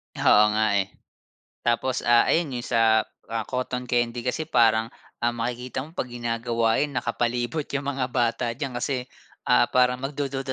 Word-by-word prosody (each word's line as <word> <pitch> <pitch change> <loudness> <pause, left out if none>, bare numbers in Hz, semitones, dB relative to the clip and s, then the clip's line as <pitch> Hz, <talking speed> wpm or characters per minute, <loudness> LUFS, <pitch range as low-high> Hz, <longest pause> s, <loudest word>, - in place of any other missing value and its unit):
Oo 105 0 +5
nga, 110 -1 +2
eh. 95 -1 -2 0.7
Tapos, 125 +2 0
ah, 120 0 +5
ayon 160 -4 +1
'yong 120 - -3
sa, 110 -1 +4 0.3
ah, 115 -1 -1
cotton 125 -1 -3
candy 120 0 0
kasi 125 +6 -2
parang, 115 -3 +3 0.3
ah, 120 - +2
makikita 125 +2 -4
mo 155 +5 -10
'pag - - -1
ginagawa 115 -1 0
'yon 145 0 0
nakapalibot 120 +3 -1
'yong 140 0 -4
mga 135 -2 -1
bata 120 -1 +1
diyan 130 0 -5
kasi, 125 0 -2 0.4
ah, - - +5
parang 125 0 +4
magdududa 135 -1 -3
120 Hz, 160 wpm, -25 LUFS, 115-130 Hz, 0.7 s, Oo